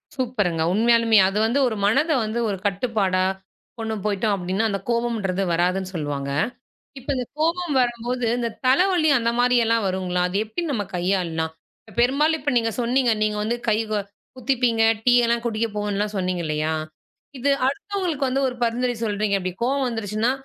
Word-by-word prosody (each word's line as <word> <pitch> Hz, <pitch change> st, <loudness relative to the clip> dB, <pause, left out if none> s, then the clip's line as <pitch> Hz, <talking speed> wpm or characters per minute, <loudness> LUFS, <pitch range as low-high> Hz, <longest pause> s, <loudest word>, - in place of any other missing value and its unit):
சூப்பர்ங்க. 215 Hz, -, -1 dB
உண்மையாலுமே 230 Hz, +1 st, +4 dB
அது 195 Hz, -, -3 dB
வந்து 240 Hz, +5 st, +1 dB
ஒரு 225 Hz, -, -2 dB
மனத 275 Hz, +11 st, +2 dB
வந்து 220 Hz, +2 st, -2 dB
ஒரு 200 Hz, -, -2 dB
கட்டுப்பாடா 200 Hz, -2 st, 0 dB, 0.6 s
கொண்டு 220 Hz, -1 st, -2 dB
போய்ட்டோம் 205 Hz, 0 st, +1 dB
அப்படின்னா, 190 Hz, +3 st, -1 dB
அந்தக் 195 Hz, -1 st, -4 dB
கோபம்ன்றது 225 Hz, -5 st, 0 dB
வராதுன்னு 185 Hz, +2 st, 0 dB
சொல்லுவாங்க. 145 Hz, -3 st, -3 dB, 0.7 s
இப்ப 265 Hz, -, -13 dB
இந்தக் 250 Hz, -2 st, -5 dB
கோபம் 335 Hz, 0 st, 0 dB
வரும்போது, 240 Hz, 0 st, -1 dB
இந்தத் 235 Hz, -2 st, -4 dB
தலவலி 340 Hz, +4 st, +3 dB
அந்த 230 Hz, -1 st, 0 dB
மாரில்லாம் 235 Hz, -3 st, +3 dB
வருங்களா? 185 Hz, -1 st, -1 dB
அதை 180 Hz, +2 st, -2 dB
எப்படி 280 Hz, +11 st, -4 dB
நம்ம 220 Hz, -6 st, -1 dB
கையாள்லாம்? 175 Hz, -3 st, -1 dB, 0.5 s
பெரும்பாலும் 295 Hz, +6 st, +3 dB
இப்ப 285 Hz, 0 st, -1 dB
நீங்கச் 225 Hz, 0 st, -1 dB
சொன்னீங்க 245 Hz, +1 st, +2 dB
நீங்க 210 Hz, 0 st, 0 dB
வந்து 225 Hz, +3 st, 0 dB
கை 215 Hz, -, +3 dB
கு 215 Hz, -, +1 dB, 0.4 s
குத்திப்பீங்க, 245 Hz, -2 st, +1 dB, 0.2 s
டீ 245 Hz, -, +5 dB
எல்லாம் 235 Hz, 0 st, 0 dB
குடிக்கப் 225 Hz, -1 st, -2 dB
போவோன்னுலாம் 210 Hz, 0 st, -2 dB
சொன்னீங்க 185 Hz, -1 st, -1 dB
இல்லையா? 155 Hz, +1 st, -1 dB, 0.6 s
இது 280 Hz, +3 st, +1 dB, 0.2 s
அடுத்தவங்களுக்கு 330 Hz, -1 st, -2 dB
வந்து 270 Hz, +2 st, 0 dB
ஒரு 250 Hz, -, -4 dB
பரிந்துரை 245 Hz, +1 st, 0 dB
சொல்றீங்க. 205 Hz, -1 st, 0 dB
அப்படி 185 Hz, 0 st, -3 dB
கோபம் 270 Hz, +1 st, +1 dB
வந்துருச்சுன்னா 225 Hz, 0 st, -1 dB
225 Hz, 155 wpm, -23 LUFS, 195-250 Hz, 0.7 s, டீ